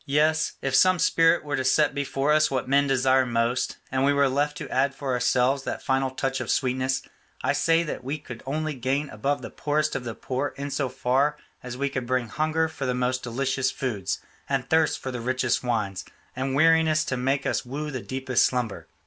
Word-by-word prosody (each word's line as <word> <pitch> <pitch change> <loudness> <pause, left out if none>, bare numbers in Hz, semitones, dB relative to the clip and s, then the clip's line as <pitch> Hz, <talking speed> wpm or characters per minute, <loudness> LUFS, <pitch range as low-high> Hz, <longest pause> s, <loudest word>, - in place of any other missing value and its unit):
Yes, 155 +3 +2
if 135 - -1
some 185 +6 +5
spirit 165 0 +3
were 145 -1 -2
to 130 - -1
set 145 +3 +3
before 140 +1 0
us 155 0 +4
what 130 -2 -2
men 140 +1 +3
desire 130 0 +3
most, 120 0 0
and 130 0 +1
we 140 - +4
were 140 -1 +3
left 145 +2 0
to - - -6
add 135 +1 +1
for 135 -2 -3
ourselves 125 +2 +2
that - - -5
final 135 0 +1
touch 135 +1 -2
of - - -5
sweetness, 130 0 0 0.4
I - - +2
say 165 +3 +3
that 150 -5 -5
we 140 +4 -3
could 120 -6 -10
only 155 +2 -2
gain 135 +3 -2
above 140 +7 -2
the - - -7
poorest 150 +1 -1
of - - -2
the 115 -2 -5
poor 130 +2 -3
in 140 +1 -4
so 140 -1 -1
far 130 +4 +1 0.2
as 125 -1 -7
we 140 +1 0
could 130 -3 -4
bring 125 -2 0
hunger 155 +4 0
for 140 -4 -5
the 125 - 0
most 125 0 0
delicious 130 +2 -1
foods, 105 -8 -3 0.3
and 135 -2 -1
thirst 160 -1 +3
for 130 - -5
the 125 -1 -5
richest 130 0 0
wines, 105 -6 -1 0.3
and 130 +1 -2
weariness 160 0 +4
to 130 - -2
make 135 +2 0
us - - 0
woo 145 +4 -5
the 130 -3 -4
deepest 130 -1 0
slumber. 125 -5 -1
135 Hz, 210 wpm, -25 LUFS, 125-145 Hz, 0.4 s, some